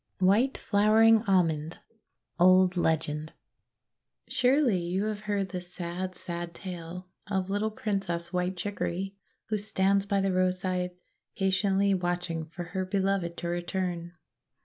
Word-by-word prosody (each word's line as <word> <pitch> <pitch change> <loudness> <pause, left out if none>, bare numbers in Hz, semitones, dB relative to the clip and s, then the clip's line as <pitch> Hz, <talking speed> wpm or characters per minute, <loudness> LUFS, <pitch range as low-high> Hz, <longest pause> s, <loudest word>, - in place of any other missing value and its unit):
WHITE 205 +8 +3
FLOWERING 220 +2 +5
ALMOND 165 -4 +1 0.6
Old 185 +1 +6
Legend 155 -2 0 0.9
SURELY 255 -5 +3
you 175 +3 -1
have 215 -1 -2
heard 200 -2 0
the 180 -1 -4
sad, 180 +1 -5
sad 170 -1 -4
tale 180 -1 -7 0.2
of 190 -1 -1
little 205 +2 0
Princess 190 -5 -2
White 180 +1 -1
Chicory, 195 0 -3 0.3
who 215 -1 0
stands 195 -1 +1
by 200 -1 +2
the 195 -1 +1
road 185 0 +2
side, 180 -1 -2 0.4
patiently 195 +1 +2
watching 175 -3 -2
for 170 +3 -7
her 190 -1 0
Beloved 190 -2 0
to 175 - -4
re 175 0 -1
turn. 175 -1 -3
185 Hz, 130 wpm, -28 LUFS, 175-200 Hz, 0.9 s, Old